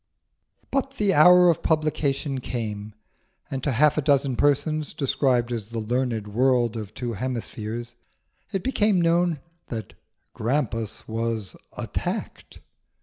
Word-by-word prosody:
But 275 0 -1
the 205 -5 +2
hour 180 +3 +7
of 165 - -3
publication 150 -3 0
came; 105 -4 -5 0.6
and 135 -1 -3
to 145 - +1
half 150 +5 +4
a - - +1
dozen 140 -2 +2
persons, 145 +3 +1
described 125 -3 +1
as 110 -3 -4
the 115 - -6
learned 115 -1 -1
world 120 +1 +2
of 105 -3 -6
two 120 -2 -3
hemispheres, 120 0 -4 0.6
it 195 -3 -2
became 215 -7 +2
known 170 -2 +2 0.3
that 110 -5 -6 0.4
Grampus 115 -3 -2
was 115 -2 -3 0.2
attacked. - - -5
130 Hz, 125 wpm, -25 LUFS, 115-155 Hz, 0.6 s, hour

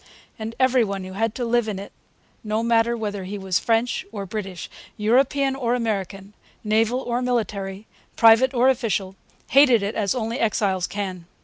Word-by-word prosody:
And 220 +1 -5
every 260 -1 +4
one 195 -2 -3
who 185 0 -8
had 225 +2 -1
to 245 - -2
live 235 -1 +1
in 210 -3 -3
it 200 +1 -8 0.5
no 215 +1 -1
matter 235 0 +2
whether 205 -3 -4
he 200 +2 -5
was 190 -2 0
French 230 +1 0
or 200 -3 -5
British, 190 -3 -6 0.3
European 265 +5 +2
or 245 -2 0
American, 200 -4 -3 0.3
naval 225 +4 +1
or 245 -1 -2
military, 210 -5 -2 0.3
private 230 +3 +6
or 250 -1 +3
official 210 -7 0 0.4
hated 255 -6 +6
it 200 +2 -2
as 210 +3 0
only 230 +1 -3
exiles 200 -5 0
can. 185 -4 -5
220 Hz, 170 wpm, -23 LUFS, 200-240 Hz, 0.5 s, private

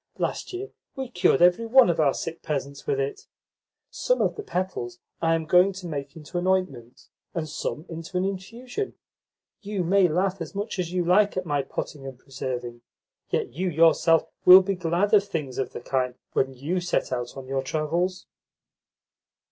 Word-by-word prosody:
Last - - -2
year 385 +3 -6 0.2
we 265 -2 -4
cured 180 -3 +3
every 180 +6 +4
one 255 0 +7
of 170 - 0
our 145 -3 +3
sick 165 - -5
peasants 140 -1 -4
with 425 -1 +1
it. 430 0 -3 0.6
Some - - 0
of - - +1
the - - -5
petals 180 - -3 0.2
I 165 0 +3
am 160 -1 -2
going 180 +4 +5
to 190 -1 -9
make 140 -4 -5
into 165 +3 -5
an 180 - -2
ointment, 160 -11 -2 0.3
and 160 -2 -2
some 155 +1 -4
into 165 +2 -6
an 185 - +1
infusion. 230 - -5 0.7
You 205 -3 -2
may 190 +2 +4
laugh 185 +3 0
as 165 +3 -6
much 205 0 -3
as 175 -2 -2
you 180 -1 0
like 200 +3 +3
at 185 - -1
my 145 -3 0
potting 135 +1 -6
and 130 -2 -8
preserving, 125 -3 -6 0.5
yet - - -1
you 180 +6 -1
yourself 165 0 +4 0.2
will 185 +1 +10
be 195 +1 0
glad 180 +3 0
of 205 -2 +7
things 150 -10 -4
of 135 - -2
the - - -7
kind 125 0 -1 0.2
when 135 0 +1
you 155 +8 -2
set 175 - -1
out 120 0 -4
on 135 - -7
your 135 0 -1
travels." 165 +6 -1
175 Hz, 185 wpm, -25 LUFS, 140-190 Hz, 0.7 s, will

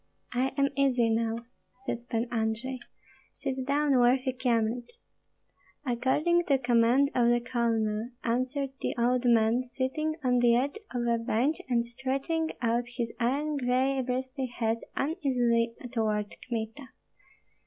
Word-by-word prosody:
"I 250 +2 +2
am 275 0 +3
easy 250 -4 +3
now," 230 +1 -1 0.4
said 240 -2 -4
Pan 230 0 0
Andrei; 230 +3 -1 0.5
"sit 265 -2 -3
down, 285 0 +2
worthy 255 +2 +3
Kyemlich." 240 - 0 0.9
"According 285 +8 +2
to 275 - +3
command 245 +2 +3
of 240 -1 +3
the 240 0 +4
colonel," 230 -2 0
answered 255 +3 -1
the - - -1
old 245 +1 +2
man, 235 +1 +3
sitting 310 +4 -1
on 250 -1 +3
the 240 -1 +5
edge 280 - 0
of 245 -1 -2
a 235 -1 +2
bench 250 +6 +1
and 235 -1 +2
stretching 275 +7 -2
out 235 +1 +1
his 235 -2 -2
iron 285 +5 0
gray 260 +1 +1
bristly 260 +1 -2
head 230 -2 -1 0.2
uneasily 245 -7 +1 0.2
toward 215 -3 -1
Kmita. 230 +3 -4
245 Hz, 130 wpm, -29 LUFS, 235-270 Hz, 0.9 s, the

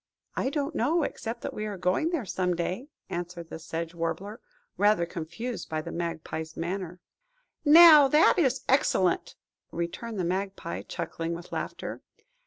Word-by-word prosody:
"I - - 0
don't 285 +2 -2
know, 310 +5 +2
except 230 -4 -4
that - - -4
we 215 0 -4
are 205 -2 -5
going 185 - +1
there 330 -9 -2
some 180 -1 0
day," 185 +9 -3 0.2
answered 175 -1 -5
the - - -6
Sedge 165 +1 -5
Warbler, 170 +6 -4 0.4
rather 205 -4 +3
confused 175 +8 -6
by 155 -1 -2
the - - -6
Magpie's 160 -1 -4
manner. 180 +1 -4 0.6
"Now, 310 -2 +9
that 300 +6 +5
is 265 -5 +2
excellent!" 190 -9 +2 0.4
returned 190 +7 -4
the - - 0
Magpie, 185 - -3
chuckling 165 0 -4
with 170 +1 -10
laughter. - - -5
185 Hz, 150 wpm, -28 LUFS, 170-250 Hz, 0.6 s, Now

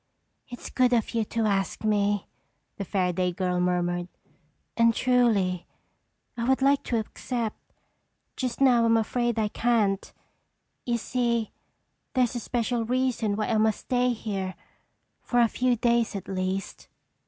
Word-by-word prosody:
"It's 245 - -9
good 250 -1 +3
of 230 -3 +1
you 230 -1 +1
to 225 +1 -1
ask 195 -1 -1
me," 205 -1 +1 0.5
the 200 - -3
Fairaday 180 -2 0
girl 180 -1 0
murmured, 175 0 0 0.7
"and 230 -1 +4
truly, 215 -8 +2 0.7
I 235 - -3
would 265 0 +2
like 280 +1 +4
to 235 - 0
accept. 225 +1 -4 0.6
Just 255 -3 -3
now 245 -3 +5
I'm 230 0 +4
afraid 240 +1 0
I 215 -1 +1
can't. 210 -4 +1 0.8
You 240 -1 +1
see, 235 -1 -1 0.6
there's 250 -2 +2
a 240 - -2
special 235 0 -1
reason 245 -3 0
why 215 0 -2
I 225 - +2
must 220 -1 +2
stay 250 0 +1
here—for 205 +3 -5
a 235 - +6
few 250 +2 +1
days 235 -1 +1
at 195 - -6
least." 190 0 -3
225 Hz, 140 wpm, -26 LUFS, 195-245 Hz, 0.8 s, a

